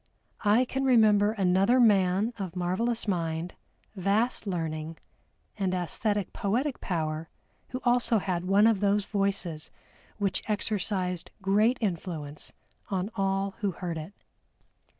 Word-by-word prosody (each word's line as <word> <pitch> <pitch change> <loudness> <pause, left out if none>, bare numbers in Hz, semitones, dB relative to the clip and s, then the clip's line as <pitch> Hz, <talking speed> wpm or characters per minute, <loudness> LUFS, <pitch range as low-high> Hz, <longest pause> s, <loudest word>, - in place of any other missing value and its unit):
I 220 +4 +4
can 270 +2 -2
remember 215 -5 +5
another 195 +4 +3
man 200 -1 +4
of 185 -3 -5
marvelous 190 +7 -1
mind, 165 -2 -2 0.4
vast 210 +5 0
learning, 160 -3 -3 0.6
and 190 -2 0
æsthetic 200 +3 -1
poetic 245 +8 -1
power 160 -2 -2 0.4
who 255 - -4
also 245 -2 +3
had 180 -3 -1
one 200 +3 +4
of 225 -3 +4
those 205 0 +2
voices 195 -7 -2 0.5
which 200 -3 -1
exercised 195 -4 -1
great 210 +6 +3
influence 165 -7 -4 0.4
on 195 +2 -2
all 195 0 0
who 200 -4 -1
heard 170 -2 -4
it. 155 +6 -8
195 Hz, 120 wpm, -28 LUFS, 180-215 Hz, 0.6 s, remember